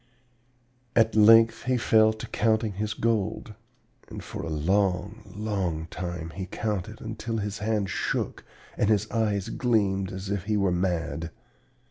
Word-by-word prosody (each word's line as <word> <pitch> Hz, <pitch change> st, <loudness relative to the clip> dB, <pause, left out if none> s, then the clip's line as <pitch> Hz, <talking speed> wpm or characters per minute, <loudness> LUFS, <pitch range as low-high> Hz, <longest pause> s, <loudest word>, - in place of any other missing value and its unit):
"At 115 Hz, -1 st, +4 dB
length 115 Hz, +2 st, +6 dB
he 130 Hz, 0 st, +2 dB
fell 110 Hz, -2 st, +4 dB
to 110 Hz, 0 st, -7 dB
counting 110 Hz, 0 st, +1 dB
his 105 Hz, +3 st, -3 dB
gold; 110 Hz, -1 st, -1 dB, 0.6 s
and -, -, -8 dB
for -, -, -6 dB
a 80 Hz, -, -5 dB
long, 95 Hz, +6 st, 0 dB
long 95 Hz, -7 st, -2 dB
time 85 Hz, -2 st, -5 dB
he 95 Hz, +3 st, -6 dB
counted, 105 Hz, +1 st, -3 dB
until 115 Hz, 0 st, -4 dB
his 105 Hz, 0 st, -3 dB
hands 105 Hz, -2 st, -1 dB
shook, -, -, -2 dB, 0.3 s
and 105 Hz, -, +2 dB
his 110 Hz, 0 st, +2 dB
eyes 105 Hz, -4 st, 0 dB
gleamed 100 Hz, -6 st, +1 dB
as 95 Hz, +1 st, -5 dB
if 100 Hz, -3 st, -2 dB
he 105 Hz, -1 st, +1 dB
were 100 Hz, -2 st, +2 dB
mad. 85 Hz, -2 st, -1 dB
105 Hz, 145 wpm, -27 LUFS, 95-110 Hz, 0.6 s, length